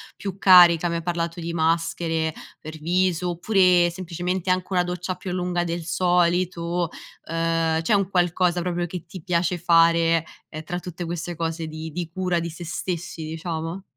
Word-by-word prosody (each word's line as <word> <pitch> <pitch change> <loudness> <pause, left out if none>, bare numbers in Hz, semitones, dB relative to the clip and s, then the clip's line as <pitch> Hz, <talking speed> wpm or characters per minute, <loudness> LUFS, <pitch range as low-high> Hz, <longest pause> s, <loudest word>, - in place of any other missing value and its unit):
più 195 -2 -6
carica? 175 -2 +7
Mi 170 - -2
hai 165 - -3
parlato 170 -1 -2
di 170 0 -4
maschere 165 0 0 0.3
per 155 +1 -9
viso 180 +2 +1
oppure 180 -1 +3
semplicemente 180 +1 -3
anche 185 0 +1
una 180 -1 +3
doccia 180 +1 -4
più 185 - -6
lunga 180 -1 -1
del 170 0 -3
solito? 175 -1 +1 0.4
Ehm, 165 0 0
c'è 210 - +1
un 195 -2 +2
qualcosa 175 -1 +1
proprio 175 0 -2
che 175 -1 -7
ti 185 - -10
piace 175 +1 0
fare, 165 -1 +4 0.2
ehm, 155 0 -7
tra 175 +3 -4
tutte 175 0 -7
queste 175 +1 -4
cose 165 0 -3
di 155 +1 -7
di 170 +1 -4
cura 180 -1 0
di 170 0 -4
sè 170 +2 -9
stessi, 170 -1 -4
diciamo? 165 +2 -5
175 Hz, 170 wpm, -24 LUFS, 165-180 Hz, 0.4 s, carica